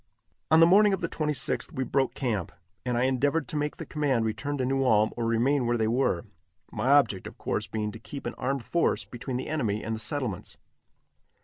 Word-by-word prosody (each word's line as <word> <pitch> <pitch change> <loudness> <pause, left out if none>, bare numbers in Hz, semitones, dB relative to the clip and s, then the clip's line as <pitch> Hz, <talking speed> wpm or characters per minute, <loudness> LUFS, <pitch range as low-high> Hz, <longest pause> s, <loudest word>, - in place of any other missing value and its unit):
On 160 - +6
the 165 - +9
morning 200 +4 +6
of 195 - -1
the 170 - 0
26th 150 -3 -1
we 130 - -1
broke 135 +1 0
camp, 110 - -2 0.3
and 125 -1 -1
I 120 - +2
endeavored 140 +4 +1
to - - -3
make 150 0 -2
the - - -6
command 135 -6 0
return 145 +6 -2
to 130 - 0
New 135 +1 +1
Ulm 110 -4 +3
or 115 -1 -2
remain 120 +3 +2
where 120 0 +1
they 110 -1 +1
were 120 +1 +1 0.5
my 110 +2 -2
object, 130 -10 +3
of - - -11
course, - - -2
being 105 -1 -3
to 115 - -10
keep 140 +4 -9
an 120 - -3
armed 135 0 -2
force 170 - +1
between 125 +1 -5
the 130 - -4
enemy 115 -9 -1
and 110 +1 -2
the - - -6
settlements. 125 - -3
130 Hz, 215 wpm, -27 LUFS, 115-145 Hz, 0.5 s, the